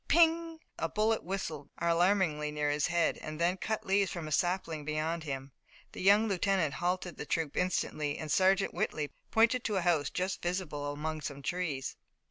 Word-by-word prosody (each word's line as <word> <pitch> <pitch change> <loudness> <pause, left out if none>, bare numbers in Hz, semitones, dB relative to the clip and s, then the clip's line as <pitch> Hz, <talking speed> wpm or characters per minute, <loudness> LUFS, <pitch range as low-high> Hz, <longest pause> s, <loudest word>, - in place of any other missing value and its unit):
"Ping!" 330 0 +4 0.2
a 165 - 0
bullet 220 +3 +1
whistled 165 -6 -4
alarmingly 170 -3 +2
near 150 -1 0
his 145 0 +1
head 170 -1 +1
and 155 0 -7
then 175 +2 +2
cut 220 +2 -3
leaves 195 0 +2
from 170 -3 -5
a - - -6
sapling 165 -1 0
beyond 155 +2 -2
him. 135 -1 -5 0.4
The - - -8
young 205 +4 +5
lieutenant 190 -5 +1
halted 180 +2 -2
the - - -5
troop 160 -3 -1
instantly, 155 -5 0
and 155 -1 -5
Sergeant 190 +4 +3
Whitley 150 -2 -2 0.2
pointed 230 +2 +3
to 210 - 0
a 190 - +2
house 170 -4 +2
just 185 +1 -2
visible 165 -5 -2
among 155 +2 -4
some 140 -1 -6
trees. 155 -6 -2
170 Hz, 175 wpm, -31 LUFS, 150-190 Hz, 0.4 s, young